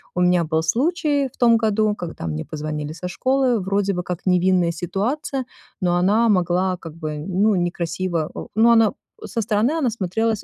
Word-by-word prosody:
у 180 - 0
меня 180 -1 +3
был 160 0 0
случай 285 - +1
в - - -24
том 235 -2 +5
году, 215 -1 +1
когда 165 - -6
мне 75 -1 -4
позвонили 150 0 -5
со 180 +2 -6
школы, 255 +4 +1
вроде 195 +1 0
бы 180 - -3
как 175 -1 -4
невинная 180 -1 +3
ситуация, 235 - -2 0.4
но 175 -1 +2
она 205 +6 +3
могла 185 -1 +1
как 165 -3 -10
бы, 155 -2 -5
ну, 190 +7 +1
некрасиво, 175 -1 -2
о - - -6
но 230 +2 +5
она 225 -1 +4 0.3
со 230 - -3
стороны 215 +4 +1
она 265 -7 +1
смотрелась 220 +1 -1
185 Hz, 180 wpm, -21 LUFS, 175-225 Hz, 0.4 s, том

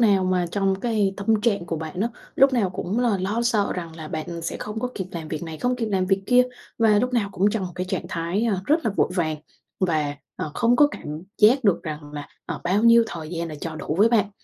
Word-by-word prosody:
nào 200 -5 +4
mà 180 -1 +1
trong 195 -1 0
cái 210 -4 +1
tâm 210 +1 +1
trạng 205 -6 +1
của 165 -1 -2
bạn 160 +3 -5
á, 225 - +2 0.3
lúc 270 0 +5
nào 215 -7 +2
cũng 190 +4 -3
là 235 -6 +2
lo 205 +5 -1
sợ 220 -4 +1
rằng 165 -3 -6
là 155 -1 -7
bạn 165 +1 -5
sẽ 165 - -3
không 210 +1 -5
có 250 - -1
kịp 190 -2 -4
làm 160 -2 -6
việc 155 0 -4
này, 160 -2 -6
không 250 0 0
kịp 230 - -2
làm 190 -3 0
việc 195 0 +1
kia, 250 0 +6 0.4
và 215 -2 +5
lúc 250 +3 0
nào 215 -5 +1
cũng 200 +3 +2
trong 205 -3 -2
một 180 - -9
cái 180 +1 -3
trạng 180 - -2
thái, 170 +6 -1
à, 215 -5 +1
rất 310 +2 +2
là 220 - +2
vội - - +2
vàng 160 -4 0 0.4
và, 155 -6 0 0.2
ờ, 155 - -4
không 240 +1 +3
có 295 - +7
cảm - - -9 0.3
giác 240 +5 +5
được 200 -5 +3
rằng 150 -2 -6
là, 145 -1 -6 0.2
ờ, - - -4
bao 195 +5 +2
nhiêu 235 0 +7
thời 160 -6 -7
gian 170 -1 -3
là 155 - -6
cho 160 -2 -5
đủ 155 - -3
với 215 - +6
bạn. 210 -4 +2
195 Hz, 260 wpm, -24 LUFS, 170-225 Hz, 0.4 s, có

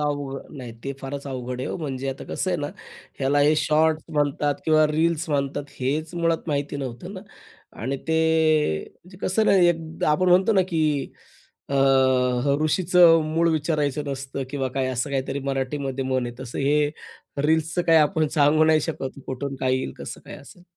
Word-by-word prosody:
अवघ 145 -2 -2 0.2
नाही, 130 -6 -8
ते 140 - -3
फारच 140 +1 -6
अवघड 125 -2 -5
आहे - - -3
ओ, - - -3
म्हणजे 135 -5 -4
आता 135 - -5
कसं - - -3
आहे - - 0
ना, - - -2 0.5
ह्याला 135 +2 +1
हे 150 +2 +4
शॉर्टस 155 +1 +2
म्हणतात 145 0 +1
किंवा 155 -1 +4
रील्स 160 +2 0
म्हणतात, 140 0 -1 0.2
हेच 155 +6 -2
मुळात 165 -1 -1
माहिती 145 -1 -2
नव्हतं 135 +7 -6
ना. 185 - -7 0.6
आणि 130 +4 -2
ते 160 - +2 0.7
म्हणजे 185 +1 -18
कसं 215 +4 +1
ना, - - +5
एक 165 -3 +1
आपण 165 +5 +2
म्हणतो 185 +5 +4
ना, 190 -3 +4
की 155 -5 0 0.6
अ, 140 - -3 0.7
ह 140 0 +2
"ऋषीचं 170 0 +5
मूळ 165 +2 +1
विचारायचं 150 -2 -1
नसतं" 135 0 -4
किंवा 135 -2 -2
काय, 130 +1 -2
असं 125 +3 -2
काहीतरी 135 0 -2
मराठीमध्ये 135 0 -2
म्हण 130 -1 0
आहे, 120 - -7
तसं 125 -2 -7
हे 145 +2 +2 0.6
रील्सचं 160 +2 +1
काही 165 -1 +5
आपण 155 +1 +2
सांगू 155 +1 +3
नाही 155 0 +4
शकत, 155 -2 -4
की - - -12
कुठून 135 +1 -4
काय 130 0 +2
येईल, 130 - -4
कसं - - -7
काय - - -9
असेल. 175 +5 -15
145 Hz, 180 wpm, -24 LUFS, 135-160 Hz, 0.7 s, ना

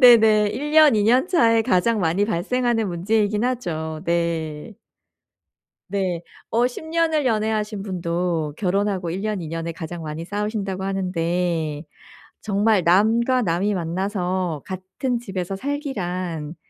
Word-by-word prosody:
네네. 220 -4 +7
1 295 +3 -4
년 310 -4 +7
2 210 - +3
년 250 +7 +4
차에 230 -11 +4
가장 215 +4 +2
많이 175 +4 +2
발생하는 225 +3 0
문제이기는 210 +5 +1
하죠. 160 -10 -3
네. 170 +2 -2 1.1
네 185 -3 -1 0.3
어 240 +2 +3
10 255 - -8
년을 320 -3 +1
연애하신 215 -2 0
분도 170 -4 -2
결혼하고 195 -2 0
1 180 +4 -3
년 210 -3 -2
2 165 - -6
년을 165 +1 -4
가장 165 0 -7
많이 155 +1 -5
싸우신다고 205 -1 -3
하는데 175 -5 -1 0.6
정말 205 -1 +2
남과 225 +8 +3
남이 190 +4 +1
만나서 180 -2 -2
같은 190 +7 -3
집에서 195 -4 -4
살기란 185 - -3
195 Hz, 245 characters per minute, -22 LUFS, 170-225 Hz, 1.1 s, 네네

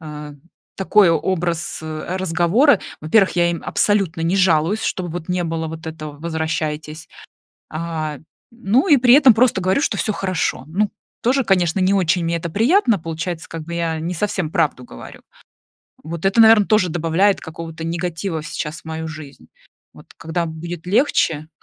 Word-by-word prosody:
а, 150 -2 -8 0.4
такой 195 0 +4
образ, 170 0 -1
а, 155 +4 -5
разговора. 190 - +3 0.2
Во-первых, 190 +6 +3
я 170 0 +3
им 170 - -5
абсолютно 195 -6 +1
не 175 +4 +1
жалуюсь, 185 +2 +2
чтобы 180 -1 -2
вот 175 0 -6
не 180 -1 0
было 165 -1 -3
вот 160 0 -8
этого- 155 -2 -7
возвращайтесь. 160 -1 -4 0.6
А, 155 -2 -4 0.3
ну 235 - +1
и 290 -4 +6
при 245 0 +5
этом 275 -4 +7
просто 235 -5 +3
говорю, 190 +9 +1
что - - 0
всё 215 - -1
хорошо. 185 -9 -2
Ну, 200 +6 0 0.3
тоже, 260 +3 +2
конечно, 185 -3 +1
не 185 +1 +2
очень 180 -2 +1
мне 170 0 0
это 170 0 -5
приятно, 235 - +3
получается, 165 +1 -5
как 165 -1 -6
бы 170 +1 -6
я 165 -2 -2
не 170 +3 -3
совсем 190 -3 -2
правду 160 -8 0
говорю. - - -12 0.8
Вот 165 +2 -6
это, 195 +4 +3
наверное, 220 -2 +7
тоже 215 -4 +3
добавляет 175 +5 +1
какого-то 165 0 -8
негатива 170 0 -3
сейчас 155 -1 -5
в - - -44
мою 160 0 -5
жизнь. 155 -3 -11 0.5
Вот - - -15
когда 165 +1 -3
будет 165 +1 -7
легче, 165 - +1
170 Hz, 165 wpm, -20 LUFS, 160-195 Hz, 0.8 s, этом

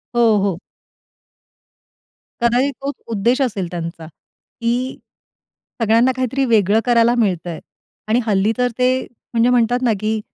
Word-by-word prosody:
हो, 230 -3 +4
हो. 195 -4 0 1.9
कदाचित, 250 +4 +2
तोच 280 +1 -3 0.2
उद्देश 235 +6 +1
असेल 205 -8 -1
त्यांचा, 170 -1 -6 0.6
की 245 +3 -1 0.8
सगळ्यांना, 230 +3 +4
काहीतरी 260 +1 -1
वेगळं 215 -3 +3
करायला 235 0 +3
मिळतंय 180 -8 -1 0.5
आणि 220 +3 +2
हल्ली 205 0 +2
तर, 250 0 +2
ते 255 +1 +2 0.3
म्हणजे 235 +1 +3
म्हणतात 245 0 +2
ना, 240 - +3
की 215 +1 -1
230 Hz, 120 wpm, -19 LUFS, 210-250 Hz, 1.9 s, हो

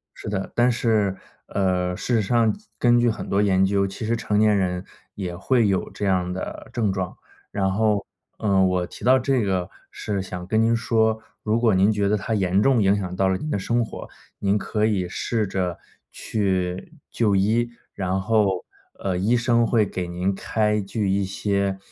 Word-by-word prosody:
是 - - -8
的。 95 -2 -3
但 120 +1 +4
是， 110 -5 +1 0.3
呃， 90 -2 0
事 125 - -2
实 110 - +2
上 115 +1 +2
及 210 - -15
根 120 0 +4
据 120 -1 +3
很 110 - -5
多 100 +1 +2
研 95 -1 +3
究， 100 0 +2
其 95 +3 -6
实 115 +1 +1
成 105 -2 0
年 105 -1 +4
人 90 -1 -1 0.3
也 90 -3 -5
会 115 +3 +2
有 95 -2 0
这 100 - -4
样 90 -1 +1
的 95 - -6
症 110 -5 0
状。 95 -2 -4 0.3
然 95 -2 0
后， 105 -1 +1 0.3
嗯， 95 -3 +3
我 90 -1 0
提 - - -11
到 130 +1 +6
这 130 -2 +1
个 95 -2 -1 0.2
是 100 -2 -3
想 90 -1 -7
跟 110 +3 +1
您 115 +1 +3
说， 110 -1 +1 0.2
如 110 +1 +1
果 115 -4 +3
您 95 +3 +4
觉 100 -1 +1
得 105 - +2
它 110 +3 -2
严 95 0 +2
重 130 -5 +4
影 100 +1 +4
响 90 -3 -4
到 95 0 +2
了 95 - +1
您 155 +10 -5
的 100 - 0
生 120 +4 0
活， - - -8 0.3
您 100 +1 +1
可 105 +1 0
以 95 -5 0
试 110 +3 -1
着 90 -2 -2 0.3
去 95 - -2 0.2
就 105 -4 +1
医。 115 +5 +2 0.2
然 95 0 -1
后， 100 -2 +1 0.3
呃， 95 -2 -2
医 110 +6 +2
生 120 -1 +2
会 110 -2 +3
给 90 -2 -4
您 90 +3 -1
开 105 +1 0
具 100 0 -2
一 100 0 +1
些， 100 0 -1
100 Hz, 210 characters per minute, -23 LUFS, 95-110 Hz, 0.3 s, 到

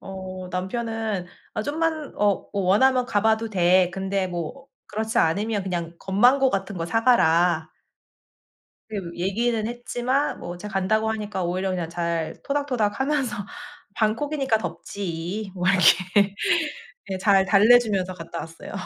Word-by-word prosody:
어 185 -1 -7
남편은 215 0 -3 0.3
"아 215 - -1
좀만 310 +1 -2
어 205 -2 +1
어 200 - -1
원하면 250 +7 +3
가 205 -3 0
봐도 220 0 +2
돼. 180 -2 +3
근데 190 +1 -1
뭐 175 - -6 0.2
그렇지 220 +1 -2
않으면 205 +5 +1
그냥 170 -3 -4
건망고 250 +8 +3
같은 195 -1 -3
거 165 - -2
사 225 +5 0
가라." 170 -8 +3 1.2
음. 180 -5 -4
얘기는 215 +5 0
했지만 245 +3 -1
뭐 175 0 -6
제가 210 +1 -8
간다고 215 +3 +1
하니까 210 -4 -3
오히려 185 +2 -1
그냥 175 -3 -2
잘 170 -1 -2
토닥토닥 255 -8 -1
하면서 265 -3 0 0.6
"방콕이니까 265 +2 0
덥지." 195 0 -5
뭐 180 0 -2
이렇게. 190 +2 +4 0.8
예. 190 - -2
잘 195 0 +4
달래 215 +5 +7
주면서 195 -6 -2
갔다 170 -1 -7
왔어요. 165 0 -9
200 Hz, 280 characters per minute, -24 LUFS, 180-230 Hz, 1.2 s, 달래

